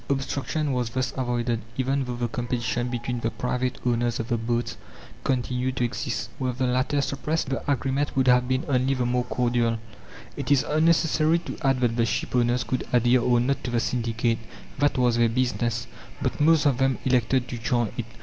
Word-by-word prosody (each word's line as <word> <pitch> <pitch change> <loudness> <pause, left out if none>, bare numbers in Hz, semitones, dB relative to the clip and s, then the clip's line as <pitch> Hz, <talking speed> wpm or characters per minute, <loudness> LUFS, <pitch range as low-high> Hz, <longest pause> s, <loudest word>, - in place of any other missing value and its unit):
Obstruction 140 +2 -1
was 125 -2 -1
thus 130 +2 -2
avoided, 120 -2 -1 0.2
even 135 +1 0
though 125 -1 -4
the 120 0 -1
competition 120 0 -2
between 120 0 -3
the 115 - -1
private 125 +1 -2
owners 120 -1 +1
of 115 - -4
the 120 - +1
boats 120 +1 -1 0.5
continued 125 0 -1
to 125 - 0
exist. 120 +1 -3
Were 130 -2 -1
the 130 +2 -1
latter 130 +3 +1
suppressed, 145 +2 -2
the 135 +2 -1
agreement 135 +2 0
would 130 - +3
have 125 0 +4
been 130 +1 0
only 135 0 +2
the 125 -2 0
more 125 0 0
cordial. 120 -2 +1 0.6
It 140 -2 -4
is 140 -2 +4
unnecessary 160 0 +3
to - - -5
add 135 -3 +2
that 120 -1 +1
the 115 - +3
shipowners 120 0 +1
could 130 - -2
adhere 125 +1 +4
or 120 0 +3
not 135 +3 0
to - - -3
the 120 -1 +1
syndicate. 115 -1 0 0.4
That 145 -1 +2
was 120 -2 +3
their 120 -1 +4
business, 120 -1 0 0.3
but - - -2
most 160 0 +5
of 140 -4 +3
them 135 -1 +2
elected 125 0 +2
to 120 - -5
join 120 -1 0
it. 120 - -3
125 Hz, 190 wpm, -25 LUFS, 120-135 Hz, 0.6 s, most